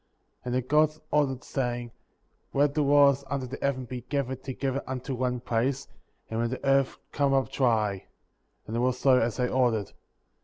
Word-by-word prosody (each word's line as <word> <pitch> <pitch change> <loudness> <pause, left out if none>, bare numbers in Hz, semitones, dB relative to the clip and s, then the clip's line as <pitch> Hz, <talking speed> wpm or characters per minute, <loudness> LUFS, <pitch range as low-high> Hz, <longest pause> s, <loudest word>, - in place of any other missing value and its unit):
^ - - -46
9. - - -45 0.4
And 125 0 -1
the 130 -1 -1
Gods 155 +1 +3
ordered, 135 -3 +1
saying: 120 -3 -3 0.6
Let 140 +1 +3
the 150 - +1
waters 140 -1 +5
under 135 -1 -2
the 130 +2 -7
heaven 130 -2 -1
be 125 0 -6
gathered 130 0 -3
together 135 0 -2
unto 130 +1 -4
one 125 -1 -1
place, 125 +3 -1 0.4
and 110 - -3
let 115 - 0
the 130 +2 -4
earth 135 -1 +3
come 140 -1 +1
up 135 -4 +1
dry; 110 -7 +1 0.6
and 110 - -5
it - - 0
was 125 +1 +1
so 130 -1 +4
as 115 0 0
they 125 -1 +1
ordered; 120 -5 +1
10. - - -27
130 Hz, 195 wpm, -27 LUFS, 120-140 Hz, 0.6 s, waters